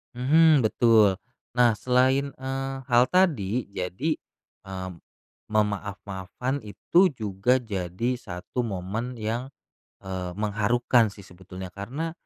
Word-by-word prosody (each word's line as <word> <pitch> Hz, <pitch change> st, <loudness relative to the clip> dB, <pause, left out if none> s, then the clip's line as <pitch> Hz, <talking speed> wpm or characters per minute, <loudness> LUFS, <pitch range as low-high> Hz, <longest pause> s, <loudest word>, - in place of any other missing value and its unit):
Mhm, 150 Hz, +3 st, +5 dB
betul, 110 Hz, -3 st, +4 dB, 0.3 s
nah, 120 Hz, -2 st, +4 dB
selain, 130 Hz, +5 st, +2 dB
eee, 135 Hz, 0 st, -4 dB
hal 120 Hz, -1 st, +5 dB
tadi 130 Hz, -, +2 dB
jadi, 100 Hz, -, -2 dB, 0.5 s
eee, 95 Hz, -1 st, -6 dB, 0.6 s
memaaf-maafkan 100 Hz, +4 st, -2 dB
itu 165 Hz, -, +2 dB
juga 110 Hz, +1 st, +1 dB
jadi 105 Hz, +2 st, -2 dB
satu 95 Hz, +2 st, -5 dB
momen 110 Hz, +4 st, -4 dB
yang, 115 Hz, +5 st, -3 dB, 0.5 s
eee, 95 Hz, -2 st, -5 dB
mengharukan 110 Hz, +4 st, +2 dB
sih 100 Hz, -, -12 dB
sebetulnya 90 Hz, 0 st, -10 dB
karena 125 Hz, -, -4 dB
110 Hz, 105 wpm, -26 LUFS, 95-130 Hz, 0.6 s, Mhm